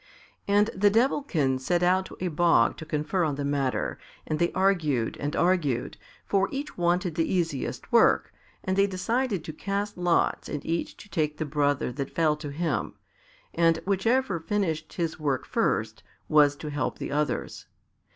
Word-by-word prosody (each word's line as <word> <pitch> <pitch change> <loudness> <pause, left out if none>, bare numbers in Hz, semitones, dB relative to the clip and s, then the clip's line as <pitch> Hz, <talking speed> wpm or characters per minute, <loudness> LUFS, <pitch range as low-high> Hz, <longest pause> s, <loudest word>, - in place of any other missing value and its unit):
And 205 +2 +3
the 205 +2 +4
Devilkins 200 - +1
set 175 +5 +1
out 185 +1 +3
to - - -12
a 180 - -1
bog 165 -7 +3
to 160 - -9
confer 155 +4 0
on 150 -3 0
the 140 0 -3
matter, 140 -2 -1 0.3
and 155 - -2
they 170 - +2
argued 160 -11 +1
and 145 0 -3
argued, 160 -9 +1 0.3
for 195 -1 +1
each 280 +2 -5
wanted 175 0 +1
the 165 +1 0
easiest 165 -7 -2
work, - - +4 0.3
and 185 - -1
they 200 +1 +4
decided 205 +2 -1
to 155 - -7
cast 200 +3 -3
lots 175 -1 +1
and 145 - -5
each 165 +1 -2
to - - -13
take 150 -3 -1
the 155 - -2
brother 145 -3 0
that 135 +1 -5
fell 155 -2 +3
to 150 -1 -6
him, 145 -4 -2 0.6
and 165 -1 +3
whichever 200 +1 +1
finished 165 -4 -2
his 165 -3 -3
work 140 -4 -1
first - - -1 0.3
was 145 -2 +5
to 150 +1 -7
help 145 - -2
the - - -5
others. 150 +1 -2
165 Hz, 170 wpm, -27 LUFS, 150-190 Hz, 0.6 s, was